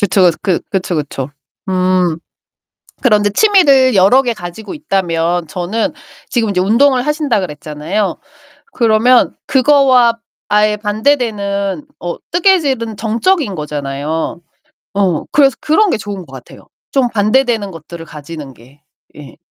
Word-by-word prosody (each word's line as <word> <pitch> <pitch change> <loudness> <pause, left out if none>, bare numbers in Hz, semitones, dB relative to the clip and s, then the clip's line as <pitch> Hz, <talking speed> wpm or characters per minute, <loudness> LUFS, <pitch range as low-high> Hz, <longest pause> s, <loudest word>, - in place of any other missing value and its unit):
그쵸. 195 -3 +4
그 185 -4 0
그쵸, 180 -3 -1
그쵸. 140 -2 -4 0.4
음. 185 -3 +1 0.8
그런데 210 -5 +3
취미를 280 - +4
여러 200 +8 +5
개 245 -3 -1
가지고 205 - -8
있다면 175 - -1
저는 190 - -2 0.4
지금 230 -4 0
이제 180 -2 0
운동을 250 +6 +3
하신다 295 -6 0
그랬잖아요. 160 +4 -3 0.5
그러면 235 +1 +3
그거와 260 -4 +4 0.3
아예 210 0 +2
반대되는 210 0 -1
어 175 -1 -4
뜨개질은 290 - +1
정적인 230 - 0
거잖아요. 150 +2 -4 0.5
어 190 -5 0
그래서 275 -2 +4
그런 365 +6 +2
게 - - +1
좋은 200 -4 -6
것 - - -18
같아요. - - -13 0.2
좀 265 -3 +2
반대되는 225 -1 +1
것들을 165 +1 -10
가지는 150 -2 -9
게. 135 +6 -20 0.3
예. 150 -2 -12
205 Hz, 275 characters per minute, -15 LUFS, 175-255 Hz, 0.8 s, 여러